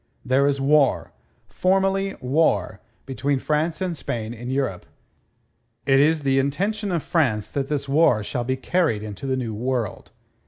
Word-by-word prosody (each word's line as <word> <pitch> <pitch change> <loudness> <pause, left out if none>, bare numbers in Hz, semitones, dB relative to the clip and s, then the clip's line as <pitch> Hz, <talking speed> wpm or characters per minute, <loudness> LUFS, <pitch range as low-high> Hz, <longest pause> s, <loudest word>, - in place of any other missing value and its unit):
There 135 +2 +3
is 140 -1 0
war 140 0 +2 0.3
formally 195 +1 +1
war 130 -6 +1 0.3
between 140 +1 -1
France 155 +6 -1
and 180 -2 -1
Spain 115 -5 -4
in 120 +1 -7
Europe. 130 -9 -2 1.0
It 135 -1 +4
is 155 +1 +3
the 135 -1 +2
intention 200 +9 -1
of 170 -4 -1
France 125 - +1
that 135 +2 -3
this 140 -2 -2
war 135 -6 +3
shall 120 +4 -3
be 130 +2 -1
carried 130 -5 0
into 110 +5 -7
the 130 -1 0
New 120 -4 -3
World. 120 -1 -3
135 Hz, 155 wpm, -23 LUFS, 125-160 Hz, 1.0 s, It